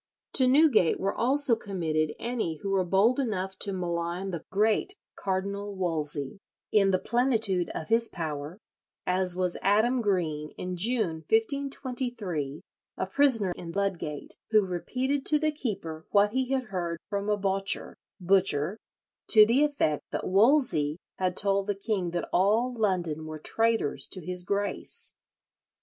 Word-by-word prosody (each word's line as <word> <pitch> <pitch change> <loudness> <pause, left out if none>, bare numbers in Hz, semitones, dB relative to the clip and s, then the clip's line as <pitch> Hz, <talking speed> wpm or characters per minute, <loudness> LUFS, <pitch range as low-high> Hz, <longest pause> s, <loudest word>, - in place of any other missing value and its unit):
To 260 - +5
Newgate 265 - +4
were 195 +1 0
also 265 0 +4
committed 160 -8 -2
any 230 -9 -2
who 195 - -2
were 195 -1 +2
bold 195 +8 +3
enough 195 -7 -2
to 200 - -2
malign 175 +1 -3
the 170 -3 -5
great 220 - +1 0.2
Cardinal 200 +1 -3
Wolsey, 155 -3 -3 0.3
in 195 -2 +4
the 185 - +3
plenitude 220 -5 +1
of 155 - -5
his 230 +1 +3
power, 155 -1 -5 0.5
as 180 -1 +2
was 180 -1 -1
Adam 220 +6 +3
Greene 160 -8 -1
in 180 0 -4
June, 205 -3 0
1523, 235 - -2 0.4
a - - -1
prisoner 225 -3 +2
in 170 -1 -8
Ludgate, 185 -7 -3
who 215 -3 +4
repeated 255 +10 -2
to 300 - +4
the 310 0 +1
keeper 190 - -5
what 205 0 +4
he 260 +1 -1
had 260 -4 -1
heard 170 -2 -2
from 200 0 -3
a 210 - +2
"bocher" 195 0 -1 0.2
(butcher), 185 0 +1 0.5
to 215 -2 +8
the 245 +6 +3
effect 280 - +1
that - - -3
Wolsey 195 - +3 0.2
had 185 -1 0
told 200 0 +2
the 205 - 0
king 195 -3 -2
that 175 0 -3
all 220 +7 +2
London 175 -8 -1
were 155 0 -6
traitors 225 -5 0
to 185 -4 -7
his 180 0 +1
Grace. 205 - -1
195 Hz, 145 wpm, -28 LUFS, 175-230 Hz, 0.5 s, to